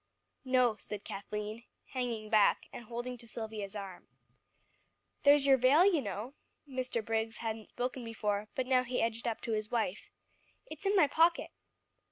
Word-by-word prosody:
"No," 255 -4 +3
said 210 -2 -7
Kathleen, 210 +3 -5 0.3
hanging 235 -4 -3
back, 215 -2 +4
and 240 - -8
holding 240 +2 -5
to 235 - -14
Silvia's 215 -3 -6
arm. 195 -3 -7 1.1
"There's 285 0 +6
your 270 -1 +6
veil, 270 +8 +6
you 355 -7 +4
know." 210 +4 -5 0.3
Mr. 255 -4 -2
Briggs 225 0 -1
hadn't 220 -1 -4
spoken 250 +1 -3
before, 210 -2 -2
but 260 - 0
now 255 -1 +3
he 250 0 -2
edged 230 +1 -1
up 230 - -2
to 230 - -4
his 215 -1 -1
wife. 220 -4 -2 0.6
"It's 410 -5 -6
in 400 - +3
my 360 -6 +7
pocket." 330 +4 +3
235 Hz, 160 wpm, -32 LUFS, 215-255 Hz, 1.1 s, my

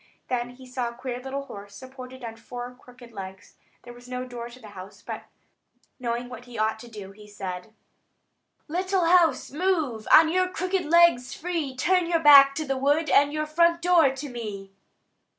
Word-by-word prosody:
Then 245 -1 -1
he 260 0 -14
saw 250 -1 -3
a 235 - -12
queer 250 0 -5
little 275 +1 -5
house, 200 -5 -11
supported 260 +1 -11
on 225 -1 -6
four 245 +2 -8
crooked 250 -1 -16
legs. 195 -2 -9 0.3
There 240 - -11
was 245 +1 -15
no 250 0 -4
door 240 -1 -7
to 245 +1 -14
the 220 -4 -12
house; 190 -1 -12
but - - -7 0.7
knowing 240 0 -3
what 250 0 -10
he 245 -2 -10
ought 220 0 0
to 240 - -11
do, 205 -4 -9
he 210 +1 -15
said: 195 0 -7 0.9
"Little 370 +2 0
house, 335 -5 +3
move 305 - -1
On 320 0 +8
your 365 +3 +1
crooked 370 0 -2
legs 330 -6 +4
free; 325 -6 -3
Turn 360 +6 +2
your 335 -1 +2
back 280 -3 +8
to 310 - -3
the 270 -1 -2
wood, 290 +3 +1
And 285 +1 +5
your 305 0 -2
front 335 +2 +2
door 340 -4 +4
to 270 +2 -6
me." 210 -6 -7
255 Hz, 185 wpm, -25 LUFS, 235-315 Hz, 0.9 s, On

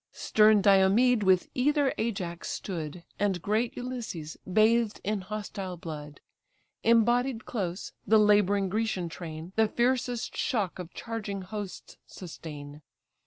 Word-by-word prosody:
Stern 215 -1 +4
Diomed 205 +5 +5
with 190 -2 +3
either 285 +1 +2
Ajax 190 -7 -3
stood, 170 -3 -5 0.2
And 200 -3 +1
great 215 +6 -1
Ulysses, 235 -11 -5 0.2
bathed 220 +2 +3
in 210 0 -1
hostile 195 -2 -5
blood. 150 -3 -8 0.6
Embodied 235 +1 +3
close, 185 -4 -4
the 220 +2 +6
labouring 205 -2 +4
Grecian 200 -3 -1
train 165 +1 -8
The 220 0 +4
fiercest 245 +1 0
shock 205 -9 -1
of 180 -1 -7
charging 210 -4 -5
hosts 195 -1 -7
sustain. 150 -4 -9
205 Hz, 120 wpm, -28 LUFS, 180-225 Hz, 0.6 s, the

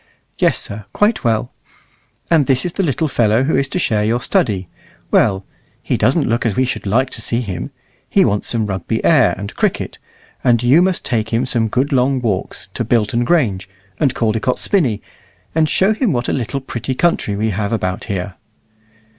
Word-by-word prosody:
"Yes, - - +3
sir, 105 0 -7
quite 215 +2 +1
well." 115 +1 0 0.8
"And 155 -5 +4
this 130 +2 +2
is 175 - -3
the - - -1
little 160 -2 0
fellow 115 -3 +2
who 150 - +1
is 135 - +1
to - - -3
share 110 -11 +1
your 115 +3 +1
study. 115 - 0 0.4
Well, 95 0 +2 0.4
he - - 0
doesn't 135 +8 +2
look 115 +1 0
as 110 -5 0
we 130 - +2
should 125 - -4
like 130 +6 +1
to 110 - -3
see 115 +2 0
him. 95 -7 -5 0.4
He - - +4
wants 100 0 0
some 115 -2 0
Rugby 95 -3 -3
air, - - +4
and 100 +2 -7
cricket. - - -1 0.4
And 120 -1 +3
you 135 +8 +5
must 185 -1 0
take 110 -3 -1
him 115 +3 +1
some 120 -3 +1
good 130 +6 0
long 130 +1 +2
walks, 110 -6 -3
to - - -2
Bilton 115 0 +1
Grange, 115 - +1 0.3
and 135 -4 +1
Caldecott's 115 +2 0
Spinney, 135 - +1 0.5
and 155 -1 +2
show 195 +3 +3
him 220 - 0
what 120 -1 -1
a - - 0
little 135 +2 -2
pretty 130 0 -4
country 145 -10 +1
we 110 +2 0
have 100 +1 -2
about 95 -4 -2
here." 95 -1 -3
120 Hz, 190 wpm, -18 LUFS, 105-135 Hz, 0.8 s, you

